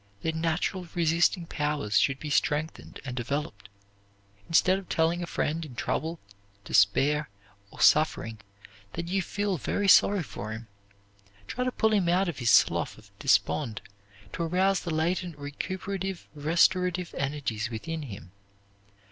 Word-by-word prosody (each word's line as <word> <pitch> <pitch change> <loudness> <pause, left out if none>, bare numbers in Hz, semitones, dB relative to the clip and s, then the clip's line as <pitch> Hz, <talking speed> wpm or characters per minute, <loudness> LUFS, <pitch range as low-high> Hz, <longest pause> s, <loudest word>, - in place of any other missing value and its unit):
Their 160 - +1
natural 165 +3 -1
resisting 170 +1 +2
powers 150 -10 0
should 135 -1 +1
be 150 - -5
strengthened 150 +2 -1
and 125 -2 -5
developed. 120 -5 -4 0.8
Instead 185 +3 +4
of 195 - -13
telling 165 +2 +1
a 175 - -4
friend 165 0 -1
in 140 -6 -9
trouble, 160 +7 -2 0.5
despair, 140 +9 +3 0.4
or - - -10
suffering 115 -8 +3 0.5
that 170 0 -4
you 195 +1 +1
feel 200 -1 -2
very 205 +9 -1
sorry 195 -1 +6
for 110 -5 -6
him, 110 +1 -8 0.8
try 250 - -3
to 255 - 0
pull 220 -2 +1
him 190 -5 +2
out 185 +2 +3
of 165 -5 -4
his 120 -2 +1
slough - - +4
of - - -18
despond, 115 -9 +1 0.5
to - - -4
arouse 185 +3 +2
the 175 - -6
latent 170 +1 -1
recuperative, 185 +6 -5
restorative 175 +4 +2
energies 135 -5 -2
within 160 +8 -5
him. 100 - -9
160 Hz, 140 wpm, -28 LUFS, 140-180 Hz, 0.8 s, sorry